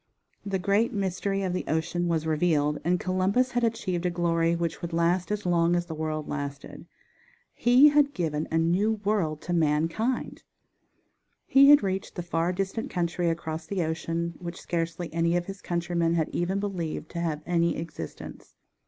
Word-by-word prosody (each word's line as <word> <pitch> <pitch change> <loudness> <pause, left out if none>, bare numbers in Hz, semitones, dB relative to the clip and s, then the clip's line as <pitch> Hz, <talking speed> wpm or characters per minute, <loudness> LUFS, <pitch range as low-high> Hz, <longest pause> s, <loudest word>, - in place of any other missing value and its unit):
The 195 -1 -1
great 200 +5 +1
mystery 195 0 -1
of 185 -2 -1
the 180 - -2
ocean 170 +2 -1
was 165 -2 0
revealed, 150 -2 +1
and 175 +2 +1
Columbus 190 +8 +1
had 245 -1 0
achieved 190 -6 -1
a 180 - +1
glory 170 -1 +1
which 170 0 -3
would 170 -1 -5
last 170 +3 +1
as 210 -1 -2
long 170 -1 +3
as 175 0 0
the 170 - -6
world 155 -1 -3
lasted. 145 -1 -6 0.7
He 250 +5 +6
had 290 -1 +3
given 155 -4 -1
a 160 - 0
new 180 +7 +2
world 165 -8 0
to 175 - -3
mankind! 165 - 0 1.0
He 275 +1 +6
had 290 -5 +8
reached 190 0 -3
the 175 - -4
far 170 0 0
distant 195 +4 -3
country 175 -1 -1
across 160 -1 -4
the 190 -2 -1
ocean, 165 +1 -2
which 170 -1 -7
scarcely 165 0 -3
any 170 +1 +2
of 175 - -2
his 195 +1 -8
countrymen 170 -1 0
had 160 -2 0
even 185 +3 -1
believed 175 -6 -4
to 170 - -4
have 160 -3 -2
any 170 -1 +1
existence. 155 - -8
175 Hz, 170 wpm, -27 LUFS, 165-195 Hz, 1.0 s, had